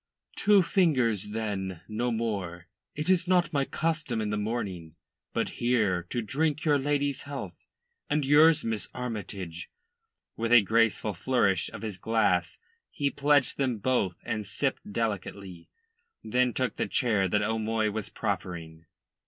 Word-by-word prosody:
"Two 205 -2 +5
fingers, 130 - +2
then 100 -5 -3
no 115 +3 -1
more. 100 -7 -3 0.3
It 150 +1 -3
is 185 -1 +3
not 175 -3 +2
my 140 -1 +2
custom 155 -7 -1
in 105 -1 -1
the - - 0
morning. 100 -7 -3 0.4
But - - -1
here 105 -8 +1
to 120 - -2
drink 150 +6 -1
your 145 -2 +4
lady's 145 0 0
health, 140 -1 -8 0.4
and 150 -1 +1
yours, 155 +3 +5
Miss 110 -5 -2
Armytage." 100 -8 -5 0.7
With 115 +1 -2
a 120 -3 +8
graceful 110 0 +2
flourish 100 -3 +1
of - - -9
his 105 -4 -4
glass 105 -5 +1 0.3
he 140 -2 -1
pledged 145 -2 +2
them 130 -4 +1
both 100 -5 0
and 105 - -2
sipped 120 +1 -2
delicately, 100 -5 -4 0.5
then 125 +3 +2
took 130 +1 -2
the - - -1
chair 105 -7 +1
that 105 +3 +1
O'Moy 110 0 0
was 110 -1 -4
proffering. 80 -2 -4
115 Hz, 145 wpm, -28 LUFS, 100-140 Hz, 0.7 s, a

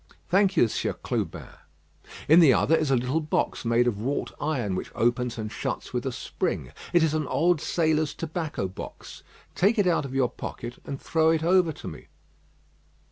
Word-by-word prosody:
"Thank 195 +1 +3
you, 120 - +6
Sieur - - -2
Clubin." - - -4 0.8
"In 160 +3 +7
the 160 -6 +7
other 155 +8 +3
is 155 -3 0
a 135 - +4
little 125 +5 0
box 155 -1 -1
made 115 +1 +3
of 110 -4 -1
wrought 135 +5 -2
iron, 130 -10 -1
which 90 - -4
opens 120 +1 0
and 110 -1 -4
shuts - - -4
with - - -2
a - - -1
spring. - - -3 0.2
It 175 -2 +4
is 155 -2 +2
an 155 -3 -1
old 170 0 +2
sailor's 155 -2 +1
tobacco 160 - -3
box. 95 - -9 0.3
Take 210 +5 +2
it 205 - +3
out 170 -5 +2
of 135 -1 -6
your 130 -2 +2
pocket, 120 +1 -7
and 135 -1 -5
throw 160 -1 +2
it 160 -1 +2
over 175 -1 +4
to - - -10
me." - - -9
150 Hz, 190 wpm, -26 LUFS, 125-165 Hz, 0.8 s, In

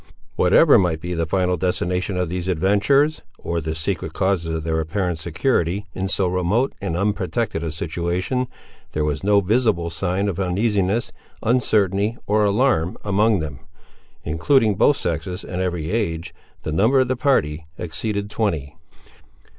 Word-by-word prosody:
Whatever 115 - +6
might 85 -4 +1
be 90 +2 -4
the 85 -1 -1
final 90 +1 +1
destination 90 +2 -1
of 90 -1 0
these 90 +1 -4
adventurers, 105 - +2 0.2
or 85 0 -3
the 80 +1 -3
secret 80 -1 -3
causes 85 -4 0
of 80 - -3
their 80 0 0
apparent 85 +1 -2
security 90 - 0
in 95 +1 -2
so 95 0 +1
remote 90 +8 +1
and 85 - -2
unprotected 100 -1 -1
a 80 - -2
situation, 85 +10 -2 0.5
there 75 0 0
was 75 +3 -2
no 100 0 +4
visible 100 -5 +1
sign 95 +3 -1
of 95 -2 -2
uneasiness, 100 +3 0 0.3
uncertainty, 110 -3 +2
or 105 +1 +2
alarm, 100 -5 +2
among 105 -1 +2
them. 70 -4 -6 0.6
Including 105 - +2
both 135 +9 +3
sexes, 85 +2 -3
and 90 0 -4
every 90 -3 -2
age, 85 -7 -2 0.3
the 80 - -3
number 110 - +3
of 130 - +1
the 130 - 0
party 75 - 0
exceeded 100 +4 -3
twenty. 80 -11 -2
95 Hz, 150 wpm, -22 LUFS, 85-105 Hz, 0.6 s, Whatever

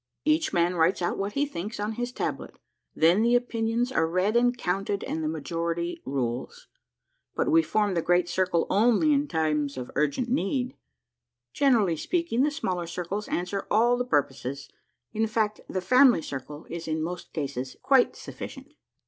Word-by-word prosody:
Each 310 +1 +2
man 175 -1 +2
writes 170 +2 +2
out 175 - -1
what 200 +1 -2
he 285 +1 +1
thinks 210 -6 -6
on 210 +1 -1
his 245 +2 -3
tablet. - - -4 0.4
Then 170 +6 +4
the 235 +2 +4
opinions 240 0 0
are 165 -10 +2
read 185 +6 +1
and 245 +1 +3
counted 195 0 -1
and 160 - -3
the - - 0
majority 170 +2 -3
rules. 130 - -3 0.7
But - - +1
we 330 +1 +6
form 210 -9 0
the 170 - +1
Great 175 +1 +2
Circle 180 -2 +1
only 240 +9 +3
in 285 +1 +1
times 150 - 0
of 125 -1 -6
urgent 150 - 0
need. 250 +2 -1 0.8
Gen 275 -3 +4
erally 185 -8 +1
speaking, 335 -9 0
the 290 - +3
smaller 185 - -3
circles 180 +5 -4
answer 180 +3 -3
all 235 +3 +4
the 245 - -1
purposes; 140 - -2 0.4
in 220 0 +1
fact, 215 -1 -1
the 185 - -2
family 250 - +5
circle 145 +3 -7
is 170 -1 -6
in 155 0 -1
most 175 +1 -6
cases 135 -4 -4
quite 265 -3 +4
sufficient." - - -9
195 Hz, 170 wpm, -27 LUFS, 165-245 Hz, 0.8 s, we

